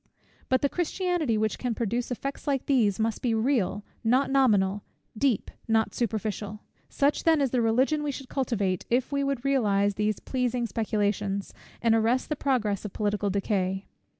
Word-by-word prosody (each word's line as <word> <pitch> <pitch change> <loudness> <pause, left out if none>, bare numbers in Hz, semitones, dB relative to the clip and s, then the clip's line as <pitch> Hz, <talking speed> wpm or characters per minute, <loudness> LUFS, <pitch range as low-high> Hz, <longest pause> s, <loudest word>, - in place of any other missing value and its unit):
But 260 +1 +2
the - - +5
Christianity 350 - 0
which 215 -1 0
can 245 -3 -2
produce 235 +2 -1
effects 275 +4 -5
like 275 -3 0
these, 225 -8 +2
must 220 -1 0
be 235 -3 +1
real, 220 -4 +1 0.2
not 255 +5 +2
nominal, 205 -7 +3 0.3
deep, 245 -2 0 0.2
not 225 -1 +2
superficial. 215 -2 -3 0.3
Such 285 +1 +1
then 325 -2 +4
is 275 -3 +1
the 250 - +2
Religion 260 +7 +2
we 295 - -2
should 270 -1 -8
cultivate, 205 -10 -1
if 250 +3 +1
we 280 0 0
would 275 -2 -2
realize 205 -7 +2
these 210 +1 -1
pleasing 250 -2 -1
speculations, 205 -3 -1 0.3
and 230 -1 +4
arrest 225 +3 +2
the 300 - 0
progress 225 -9 0
of 210 - -6
political 205 -1 0
decay. 195 -1 -1
230 Hz, 165 wpm, -27 LUFS, 205-270 Hz, 0.3 s, the